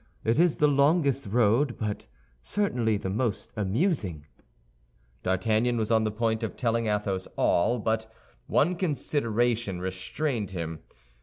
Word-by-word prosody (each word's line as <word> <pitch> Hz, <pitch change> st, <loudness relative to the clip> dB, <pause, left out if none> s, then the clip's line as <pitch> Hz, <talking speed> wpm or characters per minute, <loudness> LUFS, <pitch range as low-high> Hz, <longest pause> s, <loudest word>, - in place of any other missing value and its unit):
It 115 Hz, +6 st, +2 dB
is 175 Hz, -2 st, +4 dB
the 150 Hz, -, +4 dB
longest 140 Hz, -, +2 dB
road, 120 Hz, +5 st, +2 dB
but 105 Hz, -2 st, -4 dB, 0.3 s
certainly 120 Hz, -, 0 dB
the 95 Hz, -1 st, -4 dB
most 110 Hz, 0 st, -2 dB
amusing." 105 Hz, -, -1 dB, 1.0 s
D'Artagnan 110 Hz, +6 st, +1 dB
was 110 Hz, 0 st, -1 dB
on 110 Hz, -1 st, +3 dB
the 110 Hz, -, 0 dB
point 110 Hz, +1 st, 0 dB
of 110 Hz, -, -4 dB
telling 115 Hz, -2 st, 0 dB
Athos 100 Hz, -3 st, -1 dB
all; 115 Hz, +8 st, +2 dB
but 110 Hz, 0 st, -1 dB, 0.4 s
one 175 Hz, +5 st, +2 dB
consideration 120 Hz, -, 0 dB
restrained 95 Hz, +7 st, -3 dB
him. 80 Hz, -4 st, -5 dB
110 Hz, 130 wpm, -27 LUFS, 100-130 Hz, 1.0 s, is